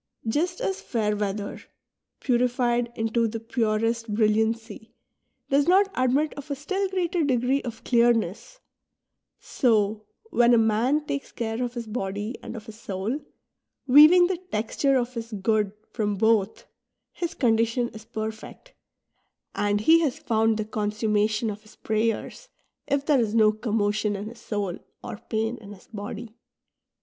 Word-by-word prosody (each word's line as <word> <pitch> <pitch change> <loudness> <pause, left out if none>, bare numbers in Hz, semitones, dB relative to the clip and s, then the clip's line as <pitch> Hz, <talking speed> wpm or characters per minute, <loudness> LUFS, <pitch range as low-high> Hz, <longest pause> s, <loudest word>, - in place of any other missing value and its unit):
Just 345 +10 0
as 385 - -2
fair 210 -3 -1
weather, 205 0 -3 0.6
purified 245 -1 +1
into 225 +1 +1
the 225 +1 -4
purest 225 0 -1
brilliancy, 220 +1 0 0.6
does 280 +2 +3
not 390 +2 +4
admit 260 +4 +1
of 285 0 -10
a 280 - -1
still 380 +7 -2
greater 360 -2 0
degree 260 0 +1
of 230 -2 -7
clearness; 235 - +1 0.8
so, 215 -3 +1 0.2
when 240 0 +5
a - - +4
man 230 +7 +2
takes 280 -1 -4
care 225 0 -3
of 245 0 -4
his 235 -1 -4
body 210 +1 -4
and - - -8
of 220 -2 -8
his 220 -1 -11
soul, 205 +6 -3 0.7
wea^^ng 305 +7 +8
the 365 -1 -3
texture 235 +6 +1
of 245 0 -2
his 230 -1 -6
good 210 0 +1 0.2
from 210 -3 -1
both, 220 - +1 0.5
his 345 -2 -4
con 230 -4 +3
dition 230 +1 0
is 220 - -9
perfect, 220 - -7 0.8
and 205 0 0
he 325 +8 +6
has 295 -6 0
found 225 -1 +1
the 215 - -2
consummation 215 +1 0
of 205 +1 -9
his 215 0 -19
prayers, 225 - -2 0.4
if 280 0 0
thei'e 295 -3 +4
is 225 -2 0
no 215 -2 +6
commotion 215 -1 0
in 205 +2 -5
his 235 0 -13
soul 200 -6 -3 0.2
or 205 - -7
pain 225 +2 -1
in 205 -2 -11
his 190 - -16
body. 215 +1 -7
225 Hz, 150 wpm, -25 LUFS, 215-255 Hz, 0.8 s, wea^^ng